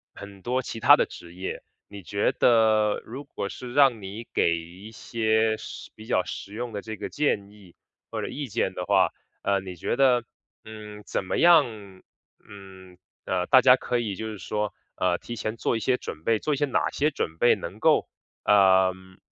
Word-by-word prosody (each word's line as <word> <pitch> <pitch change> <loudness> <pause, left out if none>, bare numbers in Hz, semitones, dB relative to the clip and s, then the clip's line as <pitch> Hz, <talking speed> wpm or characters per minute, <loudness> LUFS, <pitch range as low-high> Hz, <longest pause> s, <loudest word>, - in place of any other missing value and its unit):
很 100 -1 -11
多 125 +5 -1
其 115 - -6
它 - - +8
的 - - +1
职 85 0 -12
业， 95 +1 -5 0.3
你 100 -1 -10
觉 100 +3 0
得 110 -3 +3
如 130 +5 -8
果 120 -8 -5
是 120 +6 -8
让 135 -5 +4
你 100 +4 -8
给 85 0 +2
一 90 +6 -12
些 110 -1 0
实 110 - -9
比 110 - -12
较 95 - +2
实 100 - -7
用 120 0 -5
的 100 - -4
这 110 +1 -7
个 - - -5
建 105 -9 -1
议， 100 -4 -18 0.4
或 - - -3
者 - - -3
意 145 0 -5
见 110 -4 -1
的 90 - -4
话， 95 -1 +3 0.3
呃， 100 0 +2
你 95 -1 -8
觉 85 - -2
得， 125 -2 +4 0.4
嗯， 105 -1 -10
怎 - - -3
么 - - -2
样， 115 - +3 0.5
嗯， 95 -2 -13 0.3
呃， 90 -1 -1
大 130 -1 +7
家 125 0 +7
可 125 -1 -2
以 105 -4 -3
就 110 - -5
是 110 -2 -6
说， 105 +2 -3 0.2
呃， 90 -1 +1
提 120 - -7
前 110 0 -4
做 - - 0
一 - - -3
些 125 +4 +1
准 80 - -8
备， 115 +2 +2
做 150 - -1
一 - - -1
些 145 - +1
哪 135 - 0
些 150 +2 +1
准 80 - -4
备 120 - +5
能 - - -8
够， - - +3 0.4
呃 95 -2 +5
嗯 95 0 -18
105 Hz, 215 characters per minute, -26 LUFS, 95-120 Hz, 0.5 s, 它